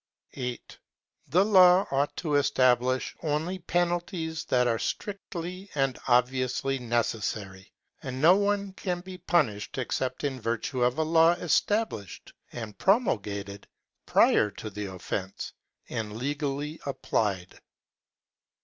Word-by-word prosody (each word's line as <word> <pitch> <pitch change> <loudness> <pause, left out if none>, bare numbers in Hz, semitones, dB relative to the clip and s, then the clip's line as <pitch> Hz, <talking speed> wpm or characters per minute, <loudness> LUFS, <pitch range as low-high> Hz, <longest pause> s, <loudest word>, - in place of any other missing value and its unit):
8. 125 -2 -6 0.5
The 185 +4 +3
law 185 -2 +7
ought 140 +1 0
to 155 -4 -2
establish 130 -2 +2
only 160 +4 -1
penalties 175 -2 -1
that 125 -1 +2
are 115 -2 +1
strictly 185 -1 -5
and 135 -3 0
obviously 130 +2 +1
necessary, 110 -5 -2 0.3
and 130 -1 -5
no 165 +6 +7
one 200 -1 0
can 180 -2 -3
be 185 0 -10
punished 135 - 0
except 130 0 -2
in 135 -3 -2
virtue 115 +3 -2
of 125 +2 +2
a 160 - +2
law 165 +1 +5
established 175 - -1 0.2
and 110 -4 -7
promulgated 100 - 0 0.4
prior 105 - +4
to 105 +2 -8
the 105 0 -5
offence 95 +1 -5 0.3
and 110 -1 -4
legally 145 +3 -3
applied. 100 -9 -2
135 Hz, 115 wpm, -28 LUFS, 115-175 Hz, 0.5 s, law